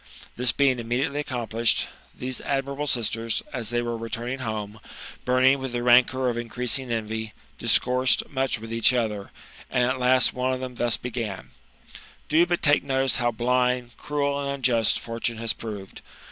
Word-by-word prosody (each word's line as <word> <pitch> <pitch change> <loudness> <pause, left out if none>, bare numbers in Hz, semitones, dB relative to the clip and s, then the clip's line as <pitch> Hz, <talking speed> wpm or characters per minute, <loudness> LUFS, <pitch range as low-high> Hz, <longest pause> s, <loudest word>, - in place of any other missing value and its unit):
This 125 0 +1
being 135 -3 +2
immediately 120 +5 -1
accomplished, 120 -5 0 0.3
these 130 0 -4
admirable 140 +1 -2
sisters, 115 -2 0
as 120 -4 -3
they 120 0 0
were 120 0 -2
returning 120 +3 -4
home, 110 -3 -4 0.5
burning 130 +2 +4
with 130 -2 -5
the 120 0 -2
rancour 125 +1 +4
of 120 -1 -1
increasing 125 +1 0
envy, 110 -1 -3 0.3
discoursed 125 +1 +3
much 135 -2 0
with 115 +1 -8
each 115 +2 +4
other, 105 -5 -1 0.4
and 125 - +1
at 130 +1 -1
last 125 -1 +4
one 130 +1 0
of 130 - -3
them 130 -1 -5
thus 120 -1 0
began: 115 -5 -5 0.4
'' - - -18
Do 160 +3 +5
but 175 -1 -1
take 145 -1 +4
notice 135 -1 +1
how 120 -1 +2
blind, 125 +1 0
cruel, 140 -1 -1
and 140 -1 -3
unjust, 125 -5 +2
fortune 115 0 -3
has 115 0 -1
proved 105 -4 -8
125 Hz, 165 wpm, -25 LUFS, 115-130 Hz, 0.5 s, Do